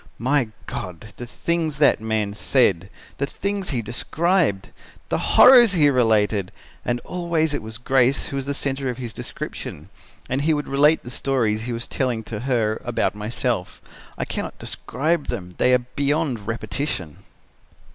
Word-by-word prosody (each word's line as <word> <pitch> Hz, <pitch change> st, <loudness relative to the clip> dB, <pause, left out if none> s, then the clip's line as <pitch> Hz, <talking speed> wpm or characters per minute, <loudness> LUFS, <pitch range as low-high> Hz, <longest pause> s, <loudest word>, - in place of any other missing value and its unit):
My 130 Hz, +1 st, +1 dB, 0.2 s
God! 90 Hz, +4 st, -7 dB
the 120 Hz, -, -7 dB
things 160 Hz, +2 st, -1 dB
that 145 Hz, -6 st, +4 dB
man 110 Hz, -2 st, -1 dB
said! 100 Hz, -6 st, +2 dB, 0.3 s
The 140 Hz, -, 0 dB
things 200 Hz, +4 st, -3 dB
he 125 Hz, -5 st, -1 dB
described! 150 Hz, -, 0 dB, 0.4 s
The -, -, -1 dB
horrors 245 Hz, -5 st, +9 dB
he 150 Hz, -5 st, +4 dB
related! 105 Hz, -6 st, +2 dB, 0.3 s
And 120 Hz, 0 st, -1 dB
always 170 Hz, -3 st, -1 dB
it 145 Hz, -, -2 dB
was 110 Hz, 0 st, -7 dB
Grace 130 Hz, +2 st, +2 dB
who 140 Hz, -, -5 dB
was 135 Hz, 0 st, -3 dB
the 140 Hz, -, -1 dB
centre 135 Hz, -1 st, -1 dB
of 125 Hz, -, -4 dB
his 120 Hz, -3 st, -6 dB
description. -, -, -7 dB, 0.4 s
And 130 Hz, +2 st, -1 dB
he 155 Hz, +1 st, +2 dB
would 145 Hz, -, -3 dB
relate 150 Hz, +3 st, +3 dB
the 120 Hz, -, -8 dB
stories 115 Hz, -5 st, 0 dB
he 125 Hz, -, -3 dB
was 115 Hz, 0 st, -4 dB
telling 125 Hz, -4 st, -1 dB
to 105 Hz, 0 st, -5 dB
her 115 Hz, -3 st, 0 dB
about 120 Hz, -1 st, 0 dB
myself. 105 Hz, -1 st, -2 dB, 0.4 s
I -, -, -2 dB
cannot -, -, -4 dB
describe 150 Hz, +5 st, -2 dB
them. 90 Hz, -1 st, -5 dB
They 125 Hz, -, +4 dB
are 125 Hz, -, +6 dB, 0.2 s
beyond 140 Hz, -6 st, 0 dB
repetition." 110 Hz, -, -3 dB
125 Hz, 160 wpm, -23 LUFS, 110-145 Hz, 0.4 s, horrors